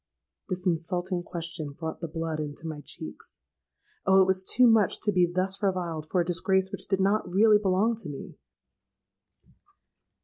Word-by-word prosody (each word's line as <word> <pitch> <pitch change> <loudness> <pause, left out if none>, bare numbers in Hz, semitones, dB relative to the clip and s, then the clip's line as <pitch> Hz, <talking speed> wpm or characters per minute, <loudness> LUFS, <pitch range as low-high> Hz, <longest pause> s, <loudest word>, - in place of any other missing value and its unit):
'—This 185 0 -3
insulting 175 +1 -1
question 165 -3 -5
brought 160 +2 -6
the 170 - -3
blood 160 -1 -4
into 150 +1 -5
my 155 -2 -5
cheeks. - - -7 0.7
Oh! 190 0 +6
it 190 - +6
was 190 0 +1
too 250 +6 +4
much 225 -4 +4
to 210 - +2
be 180 -3 +2
thus 190 +2 -1
reviled 175 -6 -1
for 185 - +1
a - - -1
disgrace 190 +2 +1
which 200 - -3
did 195 -1 0
not 200 0 +1
really 210 +2 +5
belong 205 +3 +2
to 210 -8 -7
me. 140 - -9
185 Hz, 165 wpm, -27 LUFS, 165-195 Hz, 0.7 s, Oh